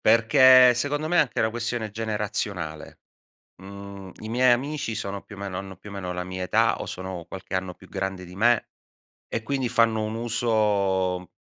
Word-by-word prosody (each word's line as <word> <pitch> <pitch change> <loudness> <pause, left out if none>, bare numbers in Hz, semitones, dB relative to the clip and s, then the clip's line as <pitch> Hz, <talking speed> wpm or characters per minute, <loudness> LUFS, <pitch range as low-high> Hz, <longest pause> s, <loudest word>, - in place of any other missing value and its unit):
perché 125 +3 +7
secondo 145 +5 -1
me 175 - +1
è - - +7
anche 140 - 0
una 110 - +2
questione 120 -1 -3
generazionale. 105 -7 -4 0.6
Mhmm, 100 -1 -9
i 110 - -7
miei 125 +2 +4
amici 135 -1 -1
sono 100 -2 -4
più 100 - -12
o - - -12
meno 100 -2 -4
hanno 95 -1 -8
più 100 +3 -12
o - - -9
meno 90 -2 -4
la 90 0 -4
mia 95 0 -5
età, 110 +5 +2
o - - -4
sono 95 -2 -6
qualche 95 0 -8
anno 95 -1 -2
più 95 - -17
grande 95 -1 -4
di 90 +1 -12
me, 115 +3 +2 0.6
e 115 - -3
quindi 130 +1 -1
fanno 115 -2 +2
un 110 - -4
uso 105 -6 0
105 Hz, 190 wpm, -25 LUFS, 95-115 Hz, 0.6 s, perché